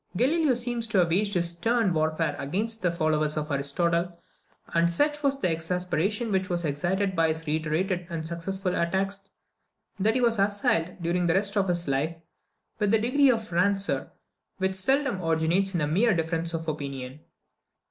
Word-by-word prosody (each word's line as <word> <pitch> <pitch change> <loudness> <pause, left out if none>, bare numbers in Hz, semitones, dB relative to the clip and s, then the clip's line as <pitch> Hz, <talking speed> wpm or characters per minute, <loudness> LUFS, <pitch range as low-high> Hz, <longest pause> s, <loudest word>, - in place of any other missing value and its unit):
Galileo 290 - +3
seems 240 -1 -2
to 215 - 0
have 175 -2 +3
waged 200 +3 +1
this 170 -1 +2
stern 225 +2 +1
warfare 155 -1 0
against 215 +11 -2
the 180 - +1
followers 155 -2 0
of 150 0 -3
Aristotle; 170 +5 0 0.6
and 170 0 +3
such 295 - 0
was 275 -2 +1
the 180 - +1
exasperation 180 +6 -1
which 190 -1 0
was 175 -1 -1
excited 185 +7 -1
by 165 -1 +3
his 160 0 -3
reiterated 160 +4 -1
and 165 -2 -4
successful 180 +3 -2
attacks, 195 +3 -2 0.7
that 220 +4 +2
he - - +2
was 230 -3 +2
assailed, 195 -4 +1
during 175 +1 +1
the 165 - +2
rest 200 +1 +1
of 200 -2 +2
his 175 -2 -1
life, 140 +5 0 0.6
with 205 -2 +2
a - - +3
degree 265 +5 +3
of 225 -5 0
rancour 195 +3 +1 0.5
which 190 0 0
seldom 245 +1 +1
originates 165 +4 +1
in 170 - +1
a 150 - +1
mere 195 +7 +3
difference 165 0 -1
of 165 0 -5
opinion. 140 -3 -5
180 Hz, 170 wpm, -26 LUFS, 165-205 Hz, 0.7 s, Galileo